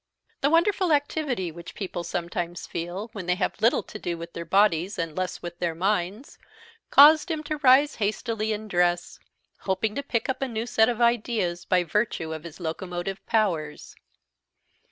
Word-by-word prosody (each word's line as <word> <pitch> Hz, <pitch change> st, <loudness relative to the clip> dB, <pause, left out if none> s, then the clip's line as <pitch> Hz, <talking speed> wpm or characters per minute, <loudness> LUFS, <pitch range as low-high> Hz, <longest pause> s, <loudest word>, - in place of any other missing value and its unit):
The 280 Hz, -, +2 dB
wonderful 345 Hz, +2 st, +3 dB
activity 285 Hz, -, 0 dB
which 170 Hz, +1 st, -11 dB
people 185 Hz, -3 st, -4 dB
sometimes 175 Hz, 0 st, -4 dB
feel 175 Hz, +6 st, -5 dB
when 190 Hz, -4 st, -7 dB
they 180 Hz, -, +2 dB
have 185 Hz, +2 st, -2 dB
little 230 Hz, +3 st, +3 dB
to 215 Hz, -, -9 dB
do 170 Hz, -3 st, -3 dB
with 170 Hz, +1 st, -9 dB
their 170 Hz, -, -6 dB
bodies, 190 Hz, 0 st, +2 dB
and 165 Hz, -3 st, -3 dB
less 185 Hz, 0 st, -3 dB
with 175 Hz, 0 st, -7 dB
their 170 Hz, -2 st, -1 dB
minds, 195 Hz, -, -2 dB, 0.5 s
caused 305 Hz, +4 st, +7 dB
him 315 Hz, -2 st, -2 dB
to 305 Hz, +1 st, -3 dB
rise 285 Hz, +1 st, +5 dB
hastily 220 Hz, +1 st, -1 dB
and 215 Hz, 0 st, -4 dB
dress, 175 Hz, -2 st, 0 dB, 0.4 s
hoping 210 Hz, +3 st, -1 dB
to 280 Hz, -, -2 dB
pick 250 Hz, -3 st, -2 dB
up 265 Hz, -, -2 dB
a 270 Hz, -, 0 dB
new 225 Hz, -2 st, -3 dB
set 220 Hz, -1 st, +3 dB
of 240 Hz, 0 st, -2 dB
ideas 220 Hz, -7 st, +1 dB
by 180 Hz, -1 st, +2 dB
virtue 170 Hz, -3 st, -1 dB
of 160 Hz, +1 st, -8 dB
his 170 Hz, 0 st, -10 dB
locomotive 175 Hz, +3 st, -4 dB
powers. 170 Hz, -10 st, -1 dB
200 Hz, 175 wpm, -26 LUFS, 175-240 Hz, 0.5 s, caused